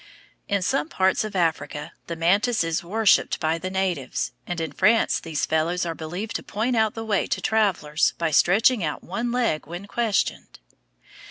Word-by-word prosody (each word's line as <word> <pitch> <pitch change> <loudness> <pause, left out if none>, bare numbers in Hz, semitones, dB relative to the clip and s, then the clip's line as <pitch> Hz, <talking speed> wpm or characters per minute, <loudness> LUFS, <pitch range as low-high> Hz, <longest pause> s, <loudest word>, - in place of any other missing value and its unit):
In 200 -2 0
some 150 -3 0
parts 190 +2 +2
of 215 -2 -6
Africa 160 -4 -1 0.2
the 170 - -4
mantis 200 +7 +2
is 165 0 -1
worshipped 210 +4 +2
by 160 +1 0
the 185 - -4
natives, 185 -8 -2 0.2
and 175 -1 -3
in 160 -1 -3
France 225 +4 +3
these 160 -3 -2
fellows 165 +3 0
are 165 - -2
believed 175 +8 -6
to - - -10
point 230 +4 -2
out 220 -2 +2
the 225 0 -5
way 205 -3 0
to - - -1
travellers 185 -9 +1
by 165 -2 0
stretching 205 - +4
out 150 -2 -3
one 235 +6 -3
leg 235 -11 0
when 175 +4 -7
questioned. 220 -1 -1
185 Hz, 175 wpm, -24 LUFS, 165-215 Hz, 0.2 s, stretching